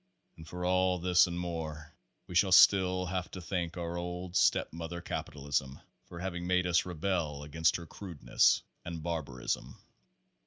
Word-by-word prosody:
And 80 - -12
for 90 +2 -5
all 90 0 +2
this 90 0 +4
and 85 0 -4
more, 80 -3 -5 0.3
we - - -10
shall 95 +2 +3
still 95 -1 +6
have 90 0 -3
to 95 - -8
thank 85 -1 -3
our 85 0 -3
old 90 +1 -5
step 95 - +3
mother, 85 +1 -5
Capitalism, 70 -5 -3 0.3
for 85 - -11
having 90 -1 -4
made 90 0 +2
us 90 0 +2
rebels 80 -4 -2
against 80 +2 +1
her 85 - -5
crudeness 85 -2 +1 0.2
and 85 -2 -6
barbarism. 75 -7 -3
85 Hz, 155 wpm, -31 LUFS, 80-90 Hz, 0.3 s, still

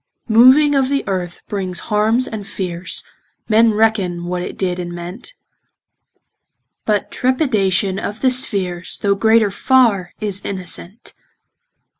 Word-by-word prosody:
Moving 260 +6 +6
of 270 -2 +1
th' 280 0 0
earth 180 -3 -4
brings 190 -3 -4
harmes 220 +4 +2
and 215 -2 -6
feares, 180 -1 -4 0.4
Men 225 +1 +4
reckon 200 -6 0
what 180 0 -3
it - - -7
did 180 -2 -2
and 175 -1 -5
meant, 180 - -8 1.5
But 210 -2 -1
trepidation 205 - 0
of 210 +2 -6
the 260 - +3
speares, 190 -8 +1
Though 200 -1 +1
greater 220 +1 +3
farre, 220 -7 +2
is 205 -2 -2
innocent. 185 +2 -5
205 Hz, 125 wpm, -18 LUFS, 185-230 Hz, 1.5 s, Moving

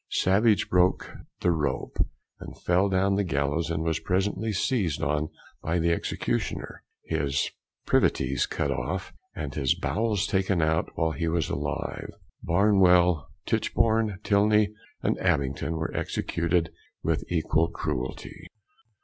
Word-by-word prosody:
Savage 105 +3 +3
broke 90 0 +2 0.3
the 90 - +3
rope, 75 -5 -1 0.4
and - - -9
fell 90 +3 +2
down 95 +1 +2
from - - +2
the 100 - +2
gallows, 80 -1 0
and 80 -1 -1
was 80 -1 0
presently 100 +4 0
seized 100 - 0
on 75 +2 0 0.3
by 80 +2 0
the 85 0 +2
Executioner, 85 - -2 0.2
his 70 -1 0 0.3
privities 65 +1 +2
cut - - -1
off, - - -3 0.2
and 70 -2 -4
his 70 -4 +1
bowels 105 -3 0
taken 95 -2 +1
out 80 +1 +1
while 80 -1 +1
he 85 +1 -2
was 80 -1 0
alive. - - -3 0.3
Barnwell, 90 -4 +4 0.2
Titchborne, 110 -3 +1
Tilney, 105 0 +3 0.3
and - - +1
Abington 70 +3 0
were 80 0 -3
executed 85 0 0 0.3
with - - 0
equal 80 -1 +2
cruelty. 70 -6 -5
85 Hz, 130 wpm, -27 LUFS, 80-100 Hz, 0.4 s, Barnwell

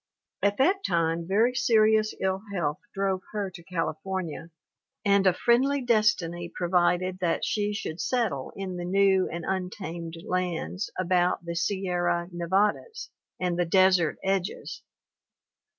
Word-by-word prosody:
At 200 0 +2
that 380 +9 +2
time 165 -1 0
very 220 +6 +3
serious 220 -3 +3
ill 190 0 0
health 155 -6 -1
drove 195 -1 -1
her 205 -3 -2
to 175 -2 -12
California, 170 -1 -4 0.6
and 200 -1 +4
a - - +7
friendly 255 +9 +2
destiny 200 -7 +1
provided 180 +1 +1
that 175 -3 0
she 210 -1 0
should 190 -5 -4
settle 225 - -1
in 190 -2 -5
the 175 - -4
new 190 +1 +3
and 170 -1 -5
untamed 175 -3 -4
lands 185 +2 -2
about 180 -1 +1
the 170 - -3
Sierra 175 -1 0
Nevadas 195 - -1 0.3
and 180 -1 -1
the 175 - +3
desert 185 -1 +4
edges. 195 0 -2
185 Hz, 130 wpm, -27 LUFS, 175-200 Hz, 0.6 s, a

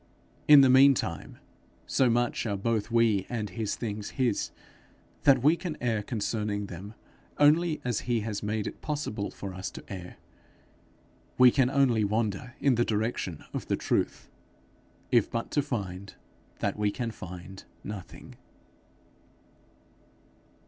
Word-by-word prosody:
In 150 -2 +10
the 135 - +6
meantime, 130 - +3 0.5
so 130 -2 +2
much 120 0 0
are 100 -2 -1
both 110 +1 -1
we 115 -5 +2
and 110 -5 -3
his 105 +1 -2
things 105 -3 -4
his, 125 -5 +1 0.8
that 135 -3 +5
we 155 +4 +5
can 170 -3 -5
err 115 -3 0
concerning 105 -1 -2
them 100 +4 -9 0.4
only 155 +2 +4
as 120 -4 -1
he 120 -2 +2
has 105 -1 -4
made 105 0 -2
it - - -7
possible 145 -9 -3
for 95 -2 -7
us 95 +1 -5
to - - -10
err; 90 -3 -7 1.2
we 125 -1 +8
can 130 -1 +3 0.4
wander 105 -2 0
only 125 - -11
in 140 - +5
the 120 0 +2
direction 105 -7 -2
of - - -4
the - - 0
truth - - -1 0.8
if - - +4
but 115 - -4
to 145 - +2
find 100 -8 -5 0.5
that - - -1
we 105 -1 +2
can 115 +2 -3
find 95 -1 -10 0.2
nothing. 100 -3 -9
110 Hz, 140 wpm, -28 LUFS, 100-125 Hz, 1.2 s, In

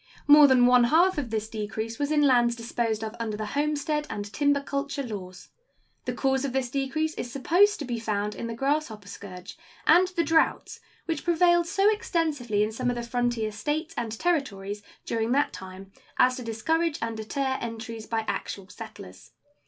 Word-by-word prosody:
More 295 0 +9
than 255 -2 +5
one 250 -1 +6
half 340 +6 +4
of 260 -5 -4
this 220 -1 -2
decrease 220 +1 -5
was 290 +1 -1
in 300 -1 +3
lands 240 -3 +4
disposed 230 -1 -2
of 220 +1 -5
under 220 -2 -3
the 215 - -3
homestead 295 +4 -1
and 205 0 -5
timber 285 -1 +2
culture 280 0 -3
laws. 185 -6 -8 0.6
The - - -2
cause 265 -1 0
of 275 -3 -2
this 260 -2 -1
decrease 285 +4 -1
is 245 - -5
supposed 365 - +3
to 290 - -5
be 240 -2 -3
found 210 -2 -2
in 230 - -5
the 230 - -5
grasshopper 270 -6 -1
scourge 190 - -10 0.3
and 350 +4 +6
the 360 -2 -1
droughts 320 +1 +1 0.3
which 325 -3 -3
prevailed 345 0 +3
so 390 +3 +2
extensively 310 - 0
in 215 - -1
some 245 +3 -1
of 245 - -1
the 240 - -4
frontier 240 -2 -1
States 295 +10 -3
and 235 -2 -3
Territories 210 - -1 0.2
during 230 +1 0
that 285 +2 +1
time 190 +1 -10 0.3
as 255 0 +4
to 250 - -6
discourage 305 +9 0
and 230 0 -3
deter 265 +5 -2
entries 225 -1 -6
by 225 -1 0
actual 195 -1 -4
settlers. - - -11
245 Hz, 185 wpm, -27 LUFS, 220-300 Hz, 0.6 s, More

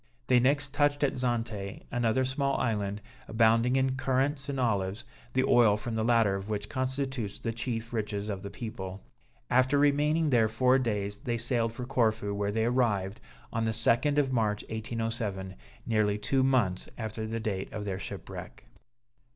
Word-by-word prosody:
They 125 -1 +5
next 140 +2 +2
touched 145 0 +2
at 140 - +2
Zante, 115 -5 -2
another 120 +1 +1
small 135 +1 0
island, 105 -3 -1 0.3
abounding 115 +2 +3
in 130 0 +1
currants 135 +2 0
and 135 -1 -2
olives, 105 -2 0 0.3
the 130 - +3
oil 115 -5 +5
from 115 +2 -5
the 110 0 0
latter 115 -3 +3
of 100 +2 -4
which 105 -1 -3
constitutes 130 -4 -2
the 115 - -3
chief 115 0 -4
riches 105 -2 -2
of 100 -3 -3
the 100 - -6
people. 100 -3 -7 0.5
After 130 +3 +4
remaining 150 +2 +3
there 115 -3 +4
four 125 +4 +3
days, 105 -4 -2
they 120 -4 -2
sailed 115 -1 +1
for 125 +1 -5
Corfu, 110 -5 +1
where 100 0 -1
they 110 +1 +1
arrived 110 -5 0 0.3
on 115 0 0
the - - +1
2d 120 +6 +2
of 135 -3 +2
March 105 -3 +1
1807, 110 -4 -3 0.3
nearly 105 -2 +2
two 130 +6 +1
months 125 -9 +1
after 110 -1 -4
the 115 +1 -3
date 100 -4 -3
of 105 -1 -5
their 95 -2 -3
shipwreck. - - -8
115 Hz, 165 wpm, -29 LUFS, 105-130 Hz, 0.5 s, They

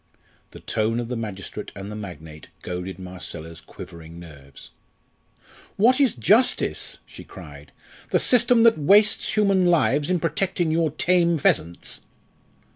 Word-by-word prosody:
The - - -13
tone 110 +2 -1
of 120 -1 -5
the 125 - -3
magistrate 105 -5 -7
and 100 +1 -7
the - - -6
magnate 80 -7 -10 0.2
goaded 90 0 -5
Marcella's 85 -3 -9
quivering 85 0 -12
nerves. 70 -5 -14 1.1
"What 255 +7 +4
is 265 -5 +2
justice?" 205 - +1
she - - -12
cried; - - -13 0.4
"the - - +2
system 240 -1 +3
that 230 -7 +5
wastes 205 +8 +3
human 195 -3 +3
lives 150 -3 +2
in 180 -1 +1
protecting 170 +1 -1
your 160 0 +1
tame 170 +2 +2
pheasants?" 85 - -1
135 Hz, 130 wpm, -23 LUFS, -, 1.1 s, that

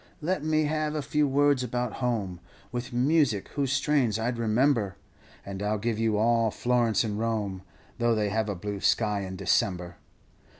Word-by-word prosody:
Let 165 0 -1
me 155 0 +2
have 155 0 -1
a 150 - -2
few 150 +1 +1
words 140 -1 +3
about 125 -1 -3
home, 105 -8 -1 0.3
With 125 +1 -4
music 125 -4 +2
whose 140 -3 -1
strains 135 -5 +2
I 115 +2 0
'd 120 - -6
remember, 115 -3 +2 0.5
And 100 0 -6
I 105 +1 0
'll - - 0
give 110 +1 -2
you 110 -2 +1
all 115 +1 +3
Florence 120 0 +1
and 105 -2 -3
Rome, 105 -4 -2 0.4
Tho' 120 -1 +3
they 105 -1 0
have 110 +1 -1
a 100 - -2
blue 100 +2 -5
sky 105 0 +2
in 95 -1 -5
December. 90 -1 0
115 Hz, 180 wpm, -27 LUFS, 105-135 Hz, 0.5 s, words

